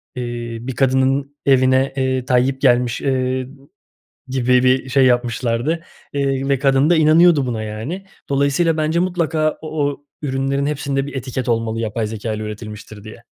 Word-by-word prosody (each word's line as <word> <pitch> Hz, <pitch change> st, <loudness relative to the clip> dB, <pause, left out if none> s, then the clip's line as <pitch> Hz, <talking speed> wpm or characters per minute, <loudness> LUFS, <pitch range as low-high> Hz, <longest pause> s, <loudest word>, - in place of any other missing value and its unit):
iii, 120 Hz, -1 st, -5 dB
bir 130 Hz, -, -4 dB
kadının 135 Hz, +2 st, +1 dB
evine, 130 Hz, 0 st, +3 dB
eee, 130 Hz, -1 st, 0 dB
Tayyip 130 Hz, +2 st, +1 dB
gelmiş, 125 Hz, -3 st, +2 dB
ııı, 130 Hz, -1 st, 0 dB, 0.8 s
gibi 125 Hz, -1 st, +2 dB
bir 130 Hz, +1 st, +2 dB
şey 130 Hz, +1 st, +3 dB
yapmışlardı, 120 Hz, +5 st, 0 dB, 0.3 s
eee, 135 Hz, -1 st, -1 dB
ve 140 Hz, -, +2 dB
kadın 135 Hz, +2 st, +3 dB
da 175 Hz, -, +5 dB
inanıyordu 160 Hz, -2 st, +5 dB
buna 115 Hz, -3 st, -3 dB
yani. 120 Hz, -, -5 dB, 0.2 s
Dolayısıyla 140 Hz, +4 st, +1 dB
bence 155 Hz, +2 st, 0 dB
mutlaka 165 Hz, -4 st, 0 dB
o 155 Hz, -, -6 dB, 0.2 s
o 145 Hz, 0 st, -11 dB, 0.2 s
ürünlerin 135 Hz, 0 st, -1 dB
hepsinde 140 Hz, -1 st, -2 dB
bir 145 Hz, -, -8 dB
etiket 130 Hz, -1 st, -4 dB
olmalı 115 Hz, -1 st, 0 dB
yapay 110 Hz, 0 st, -2 dB
zekâyla 110 Hz, 0 st, -4 dB
üretilmiştir 105 Hz, -1 st, -8 dB
diye. 115 Hz, +2 st, -12 dB
130 Hz, 150 wpm, -19 LUFS, 120-140 Hz, 0.8 s, da